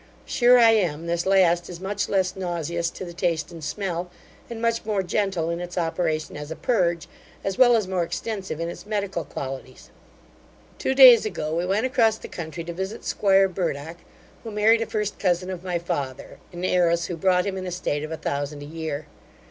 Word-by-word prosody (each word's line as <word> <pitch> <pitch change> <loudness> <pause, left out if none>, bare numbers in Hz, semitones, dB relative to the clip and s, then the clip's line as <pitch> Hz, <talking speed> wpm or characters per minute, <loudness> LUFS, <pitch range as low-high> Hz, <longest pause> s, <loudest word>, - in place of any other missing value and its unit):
Sure 245 0 +5
I 230 -2 +7
am, 170 -7 +1
this 170 +1 -1
last 175 -3 +3
is 175 -2 -8
much 200 +2 -2
less 185 -2 +1
nauseous 170 -2 -2
to 185 - -8
the 175 - -8
taste 170 -2 -1
and 165 -2 -10
smell, 175 +2 -3 0.4
and 230 -1 -6
much 230 0 0
more 210 -3 0
gentle 185 -3 -1
in 170 - -3
its 175 0 -7
operation 165 -2 -1
as 150 0 -7
a 160 - -5
purge, 170 -8 0 0.4
as 195 -1 -3
well 245 -2 +7
as 215 -4 +1
more 185 -1 0
extensive 190 -1 -4
in 165 - -2
its 175 - -8
medical 200 -5 -2
qualities. 130 -1 -7 0.9
Two 265 - 0
days 255 -4 +9
ago 160 -7 -3
we 175 +2 -1
went 205 +6 +1
across 230 -4 +3
the - - -9
country 170 0 -6
to 170 +1 -6
visit 190 +5 -5
'squire 195 -1 +3
Burdock, 165 -3 -3 0.5
who 230 - -6
married 220 +2 +3
a 225 - -1
first 210 -1 -3
cousin 180 -1 0
of 180 -1 -6
my 180 -2 -1
father, 140 -6 -5
an 175 +1 -5
heiress, 170 -2 +2
who 175 - -4
brought 180 +1 +2
him 200 -1 -2
an 185 -1 -5
estate 170 -4 -2
of 155 - -6
a 160 - -3
thousand 145 0 -3
a - - -8
year. 155 -1 -5
180 Hz, 200 wpm, -24 LUFS, 165-200 Hz, 0.9 s, days